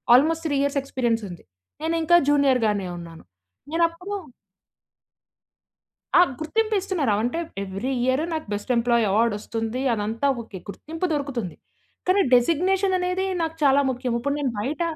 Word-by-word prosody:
Almost 320 +5 +3
3 285 -2 0
years 280 0 +1
experience 240 -4 -1
ఉంది. 175 - -10 0.4
నేనికా 330 +1 +4
junior 280 -3 +3
గానే 205 -3 -1
ఉన్నాను. 165 -1 -10 0.5
నేను 335 +1 +3
అప్పుడు 360 +5 -8 2.1
ఆ! - - +8 0.2
గుర్తింపు 435 +8 0
ఇస్తున్నారు. 360 - -1
ఆవ్ 205 - 0
అంటే 250 +8 -1 0.2
ఎవ్రీ 195 +6 -4
ఇయర్ 260 +3 +2
నాకు 315 -1 -3
బెస్ట్ 205 +5 -6
ఎంప్లాయీ 235 0 +3
అవార్డ్ 225 +2 +2
వస్తుంది. 225 +3 -4
అదంతా 220 +6 -1
ఓకే. 215 -4 -9
గుర్తింపు 320 - -4
దొరుకుతుంది. 270 - -3 0.5
కానీ 385 +2 +5
డెజిగ్నేషన్ 370 +9 +3
అనేది 365 +1 -1 0.2
నాకు 325 0 -2
చాలా 280 -1 +5
ముఖ్యం. 250 -1 -2
ఇప్పుడు 280 +4 -1
నేను 280 -3 0
బయట 285 +10 -2
280 Hz, 145 wpm, -24 LUFS, 230-330 Hz, 2.1 s, ఆ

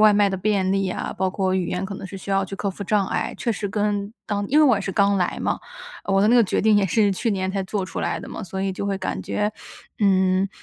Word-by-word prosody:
外 215 -1 +7
卖 205 -1 +4
的 - - -2
便 195 -1 +1
利 195 -1 +1
啊， 180 - -3
包 190 - +2
括 190 0 0
语 185 -2 0
言 180 +1 -2
可 195 +1 -5
能 - - -7
是 195 - -8
需 195 - -7
要 195 0 +3
去 195 +1 -6
克 200 - -2
服 195 - -7
障 200 0 +1
碍， - - -2
确 235 - -1
实 205 -1 -3
跟 205 0 -1
当 205 -1 -2
因 295 - +4
为 310 - +7
我 260 -5 +5
也 - - -2
是 195 - -3
刚 200 +1 +3
来 180 - 0
嘛， - - -1 0.4
我 195 0 +2
的 210 - +4
那 235 - +5
个 240 - +7
决 200 - 0
定 215 0 +5
也 205 -1 +4
是 205 +2 +3
去 230 +5 -1
年 190 -2 -1
才 195 -1 -1
做 195 0 -2
出 185 - -5
来 - - -1
的 - - -9
嘛。 - - -6
所 190 +1 -4
以 195 -1 -1
就 200 - -4
会 200 -1 0
感 - - -3
觉， 210 +1 -1 0.5
嗯， 190 -1 +3
195 Hz, 310 characters per minute, -23 LUFS, 190-205 Hz, 0.5 s, 外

